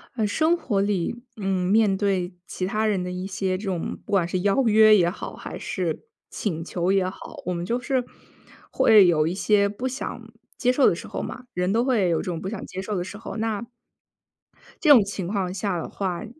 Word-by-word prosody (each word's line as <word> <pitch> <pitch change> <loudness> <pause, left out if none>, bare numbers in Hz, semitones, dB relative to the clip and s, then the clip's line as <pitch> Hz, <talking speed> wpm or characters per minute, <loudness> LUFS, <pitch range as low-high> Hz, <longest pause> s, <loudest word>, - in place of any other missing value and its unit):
呃， 215 -3 +1
生 320 +10 +2
活 210 -11 0
里， 205 +4 -1
嗯， 190 -3 -1
面 210 -2 +4
对 190 -3 -1
其 185 - -4
他 215 +3 0
人 205 -4 +1
的 180 - -4
一 180 +1 -4
些 190 -1 -2
这 195 - -9
种 185 -5 -3
不 - - -9
管 190 -4 +3
是 180 +1 -2
邀 200 +7 +2
约 215 0 +7
也 175 -4 +4
好， 180 - -7
还 - - -7
是 180 - -3 0.2
请 165 -6 -3
求 175 +1 -1
也 195 -1 +2
好， 185 - -10
我 180 - -1
们 170 0 -3
就 235 +6 -1
是 260 0 0 0.7
会 210 -4 +6
有 155 -3 +3
一 165 - -1
些 200 +1 +2
不 210 +6 -4
想 260 -1 -5 0.4
接 250 - +1
受 265 0 +4
的 - - +1
时 - - -9
候 - - -4
嘛， 250 - -7
人 180 +1 0
都 230 +4 +2
会 225 -9 +2
有 165 - +2
这 - - -2
种 170 -3 -4
不 190 - -4
想 215 -1 -6
接 185 - -6
受 205 +2 -4
的 175 - -1
时 205 - -8
候。 230 - -7
那 220 0 -2 1.2
这 310 - +3
种 260 -7 +9
情 200 -3 -4
况 190 -2 -2
下 195 -1 -2
的 - - -5
话， 190 +1 -3
195 Hz, 240 characters per minute, -24 LUFS, 180-220 Hz, 1.2 s, 种